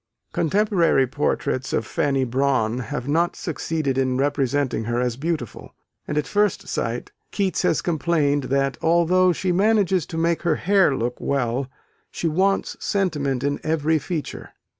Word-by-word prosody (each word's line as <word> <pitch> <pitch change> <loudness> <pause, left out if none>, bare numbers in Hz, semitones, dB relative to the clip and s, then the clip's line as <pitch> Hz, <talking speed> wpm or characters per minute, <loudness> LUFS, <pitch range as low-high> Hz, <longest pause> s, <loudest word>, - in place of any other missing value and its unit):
Contemporary 175 -6 +2
portraits 130 0 -1
of 110 - 0
Fanny 135 +2 0
Brawne 125 -2 +1
have 120 +3 -5
not 165 +4 +1
succeeded 155 -3 -2
in 130 -1 +1
representing 140 -3 0
her 120 +1 -1
as 125 -2 0
beautiful: 150 -4 -4 0.3
and 150 - -2
at 150 - +1
first 205 +2 0
sight 115 +1 -3 0.2
Keats 195 -2 -1
has - - +1
complained, 150 -4 +1
that, 135 -1 0
although 170 +2 +3
she 180 +2 -1
"manages 195 -3 +2
to 165 - -6
make 165 0 +1
her 170 -3 +1
hair 190 -6 +3
look 120 +1 -2
well," 130 -1 -1 0.4
she 170 - -3
"wants 190 +5 +1
sentiment 145 - -1
in 145 0 -1
every 160 0 +1
feature." 155 +1 -5
145 Hz, 145 wpm, -23 LUFS, 130-170 Hz, 0.4 s, although